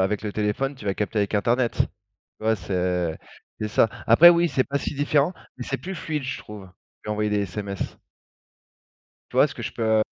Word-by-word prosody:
avec 100 +3 0
le 105 - -3
téléphone, 110 +7 -1
tu 110 - -12
vas 100 - 0
capter 105 +2 -2
avec 100 +1 0
internet, 120 +4 +2
tu - - +2 0.6
vois? 110 0 +4
C'est 90 -3 -1 0.4
c'est 110 - -1
ça. 110 - +3 0.2
Après 150 +10 +9
oui, 170 0 +3
c'est 130 - +2
pas 140 0 -1
si - - -4
différent, 145 +3 +2 0.2
mais 125 - -6
c'est 135 - -1
plus 190 +1 -6
fluide 150 -4 -3
je 130 - -3
trouve, 105 -3 -10 0.4
qu'envoyer 105 0 -1
des 105 - +1
SMS. 100 +1 -5 1.3
Tu - - -7
vois - - +7
ce - - -10
que - - -7
je - - -4
peux 110 -1 +2
110 Hz, 200 wpm, -24 LUFS, 100-135 Hz, 1.3 s, Après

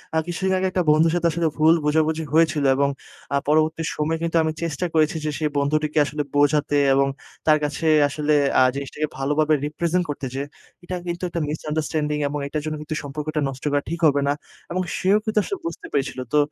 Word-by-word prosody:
আ - - +3
কিছুদিন 190 +2 -1
আগে 190 0 +1
একটা 185 -1 +1
বন্ধুর 155 +2 +4
সাথে 170 -1 +2
আসলে 165 +1 0
ভুল 160 +1 +6
বোঝাবুঝি 160 +1 +1
হয়েছিল 160 -2 +3
এবং 140 +1 +2 0.4
আ 140 - +3
পরবর্তী 155 +2 +2
সময়ে 155 +2 -1
কিন্তু, 170 0 -2
তো - - +6
আমি 160 0 -1
চেষ্টা 165 +1 -2
করেছি 155 0 +2
যে, - - 0
সেই 155 -1 0
বন্ধুটিকে 150 +2 +1
আসলে 150 +1 -3
বোঝাতে 145 0 +3 0.2
এবং 135 0 +3 0.4
তার 155 -1 +6
কাছে 150 +2 -2 0.2
আসলে 150 +1 0 0.3
আ - - +6
জিনিসটাকে 140 +2 -3
ভালোভাবে 150 +3 +1
রিপ্রেজেন্ট 170 +4 0
করতে 145 -1 -4
যে, 135 - -2 0.4
এটা 180 +1 -4
কিন্তু 175 +1 -4
একটা 170 -1 -3
মিসআন্ডারস্ট্যান্ডিং 150 0 -2
এবং 145 +1 -3
এটার 150 +1 -3
জন্য 155 0 -2
কিন্তু 155 +1 -5
সম্পর্কটা 150 +2 -4
নষ্ট 130 0 -9
করা 145 0 +2
ঠিক 170 +1 -3
হবে 145 -1 +2
না। 140 - +3 0.4
এবং 185 +2 0 0.2
সেও 195 +2 +4
কিন্তু 220 -1 +1
আসলে 400 - -4
বুঝতে 335 - -5
পেরেছিলো। 135 -2 -1
তো 150 - +4
155 Hz, 200 wpm, -23 LUFS, 145-165 Hz, 0.4 s, ভুল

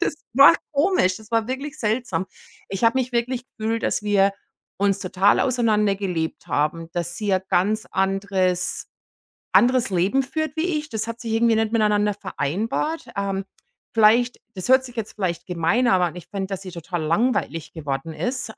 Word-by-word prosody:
Das 320 - 0 0.2
war 280 +5 +9 0.2
komisch, 285 - +2
das 220 +1 -16
war 225 -1 +1
wirklich 275 +3 -5
seltsam. 225 -2 -1 0.5
Ich 195 +3 -4
habe 230 +3 +4
mich 255 -1 -2
wirklich 240 +1 -1
gefühlt, 225 +1 -1
dass - - 0
wir 200 -1 +3 0.5
uns 200 0 +2
total 190 +1 +3
auseinander 220 -5 +2
gelebt 175 -5 -3
haben, 160 +3 -1
dass 175 0 -3
sie 205 -2 -1
ein 185 - 0
ganz 215 +4 +1
anderes 190 -2 0 0.6
anderes 245 -3 +4
Leben 190 +9 +2
führt 315 +1 -3
wie 330 0 0
ich. 300 0 -7
Das 220 0 -2
hat 230 0 -6
sich 225 -2 -4
irgendwie 230 0 +3
nicht 220 -1 +1
miteinander 210 -2 +2
vereinbart. 220 - -2
Ähm, 195 -1 -2 0.5
vielleicht 230 +3 +4
das 185 +2 -3
hört 260 0 +6
sich 245 -1 -11
jetzt 220 -1 -4
vielleicht 180 -5 -3
gemein 180 +8 +1
an, 185 -4 +4
aber 175 -1 -1
ich 175 - -9
fände, 195 -1 -4
dass 195 -1 -5
sie 185 -2 -8
total 170 -1 -4
langweilig 165 -3 0
geworden 145 0 -4
ist. 250 +1 -2
210 Hz, 175 wpm, -23 LUFS, 185-240 Hz, 0.6 s, war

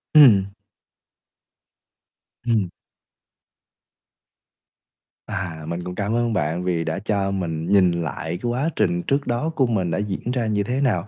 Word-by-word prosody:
Ừm. 100 -9 +7 1.9
Ừm. 110 -6 +2 2.6
À, 85 -4 -4
mình 85 +1 -3
cũng 90 0 -6
cảm 105 +3 -1
ơn 120 -1 +1
bạn 85 -1 -1
vì 90 -2 0
đã 80 +3 -2
cho 100 -1 0
mình 85 -4 -3
nhìn 95 -3 +5
lại 85 0 -3
cái 120 - -1
quá 135 +7 0
trình 85 0 +1
trước 140 +1 0
đó 120 +6 0
của 135 - +3
mình 95 -7 0
đã - - 0
diễn 105 +3 -3
ra 125 -3 0
như 105 -1 +1
thế 125 +6 -1
nào, 105 -8 +1
100 Hz, 145 wpm, -23 LUFS, 85-120 Hz, 2.6 s, Ừm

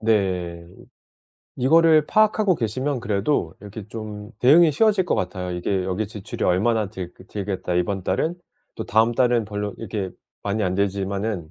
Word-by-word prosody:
네. 90 -6 0 0.9
이거를 155 +3 +5
파악하고 215 -2 +3
계시면 130 - -2
그래도 100 - 0
이렇게 105 0 -9
좀 105 -1 -7
대응이 155 +6 +6
쉬워질 205 +4 +3
것 175 - 0
같아요. 90 0 -3
이게 90 +2 -1
여기 95 +3 -2
지출이 105 -3 -5
얼마나 105 +3 +2
들 90 -2 -7 0.2
들겠다 95 -3 -3
이번 95 +2 0
달은. 155 - -1 0.4
또 - - -5
다음 110 +2 +3
달은 120 -2 +2
별로 105 0 -4
이렇게 105 -4 -4 0.3
많이 105 +2 -1
안 95 -1 0
들지만은 100 -2 -2
105 Hz, 330 characters per minute, -23 LUFS, 95-125 Hz, 0.9 s, 대응이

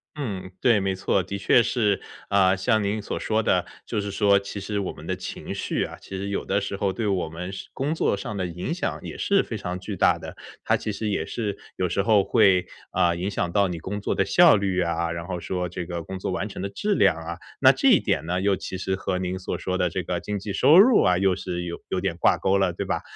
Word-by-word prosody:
嗯， 100 -10 -5
对， 120 -5 +4
没 95 -1 -1
错， 95 +1 +1
的 95 +2 -5
确 110 +4 +4
是。 105 -5 +1 0.3
呃， 95 -1 +4
像 105 +3 +1
您 100 +2 -1
所 - - -4
说 110 0 0
的， 90 -4 +2 0.2
就 105 - -2
是 100 - -4
说， 100 0 +3
其 100 +1 -7
实 100 +1 -3
我 95 - -2
们 - - -12
的 - - -2
情 - - -6
绪 - - -2
啊， - - -6
其 95 - -7
实 100 +1 -4
有 100 - -2
的 100 - 0
时 100 0 -4
候 100 0 0
对 115 +3 -3
我 95 -5 0
们 90 +3 -6
是 - - -7
工 140 +3 -1
作 160 - +1
上 105 +1 -5
的 95 -2 -2
影 90 - -4
响 180 - -3
也 - - -7
是 200 -1 +2
非 115 - -5
常 90 -2 -4
巨 90 - -6
大 - - +3
的。 - - -9 0.3
它 - - +2
其 110 - -3
实 105 +1 -3
也 100 -6 0
是 105 -4 -3 0.2
有 90 - 0
时 100 - 0
候 105 -1 +4
会， 100 -3 +4 0.3
呃， 85 -1 +2
影 90 +3 -2
响 90 -3 -2
到 100 +1 +3
你 90 -2 -4
工 100 +5 -5
作 - - -1
的 100 - +2
效 160 - +6
率 95 -2 0
啊， 85 -1 -1
然 85 0 -5
后 90 -2 -3
说 90 +1 -3
这 90 0 -5
个 85 -1 -4
工 95 +4 -6
作 95 - -3
完 100 +3 -2
成 - - -7
的 100 - -2
质 205 - -1
量 100 - +4
啊。 80 +1 -6 0.2
那 - - +8
这 - - +2
一 - - +6
点 70 - -1
呢 90 +2 -1
又 100 0 +2
其 95 - -6
实 95 0 -1
和 95 -1 -2
您 95 0 -2
所 95 - -4
说 95 0 -2
的 90 -1 +1
这 95 - -2
个 85 +1 -2
经 105 +3 -4
济 100 +2 -5
收 150 - +6
入 230 +3 +7
啊 90 0 +3
又 95 -1 +3
是 90 0 -4
有 85 -1 -5
有 90 - -1
点 95 -3 -2
挂 - - +3
钩 95 +1 +2
了， 95 -3 +1
对 - - -4
吧。 - - -1
95 Hz, 285 characters per minute, -25 LUFS, 90-105 Hz, 0.3 s, 那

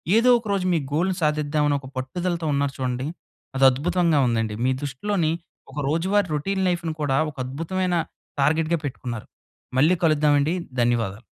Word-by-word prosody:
ఏదో 230 +3 +5
ఒక 230 - -10
రోజు 190 -2 0
మీ 165 - +2
గోల్‌ని 180 +4 +1
సాధిద్దావని 150 -1 +1
ఒక 135 - -11
పట్టుదలతో 170 +6 -2
ఉన్నారు 140 -1 0
చూడండి. 130 +1 -2 0.5
అది 135 - +5
అద్భుతంగా 170 +2 +1
ఉందండి. 115 -2 0
మీ 130 - +3
దృష్టిలోని, 160 +4 -1 0.4
ఒక 140 - -13
రోజువారీ 185 +6 +1
రొటీన్ 190 +6 -1
లైఫ్‌ని 170 -2 -1
కూడా, 135 -2 +1
ఒక 140 - -25
అద్భుతమైన 175 +6 -2 0.5
టార్గెట్‌గా 160 +3 +2
పెట్టుకున్నారు. 125 -4 -5 0.5
మళ్ళీ 160 +6 +5
కలుద్దామండి. 150 +1 +3 0.3
ధన్యవాదాలు. 115 -3 0
150 Hz, 145 wpm, -24 LUFS, 135-175 Hz, 0.5 s, ఏదో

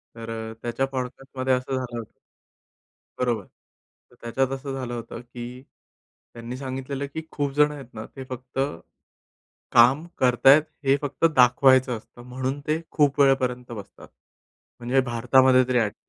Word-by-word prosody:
तर 115 -1 -6
त्याच्या 120 +3 -1
पॉडकास्टमध्ये 130 0 -3
असं 130 +1 -1
झालं 125 -2 -4
होतं 115 - -9 1.1
बरोबर. 120 -5 0 0.7
तर - - -20
त्याच्यात 130 +3 -1
असं 135 0 -6
झालं 130 -2 -4
होतं 115 0 -7
की 120 +1 -9 0.7
त्यांनी 120 +2 -7
सांगितलेलं, 135 +1 -4
की 160 - -3
खूप 145 -1 -2
जण 150 +1 +4
आहेत 135 -4 -10
ना, 110 -1 -7
ते 135 - -7
फक्त 130 +1 -6 1.1
काम 130 +6 +6
करतायेत, 135 +4 +6 0.2
हे 135 +1 +4
फक्त 145 +2 -1
दाखवायचं 130 -1 +5
असतं 110 +2 -16
म्हणून 130 +2 -3
ते 155 +2 0
खूप 145 -2 +2
वेळेपर्यंत 125 -3 +2
बसतात. 105 -4 -10 0.7
म्हणजे 125 +2 +1
भारतामध्ये 130 +1 +4
तरी 125 -1 +3
ॲट 105 -3 0
130 Hz, 140 wpm, -25 LUFS, 120-135 Hz, 1.1 s, काम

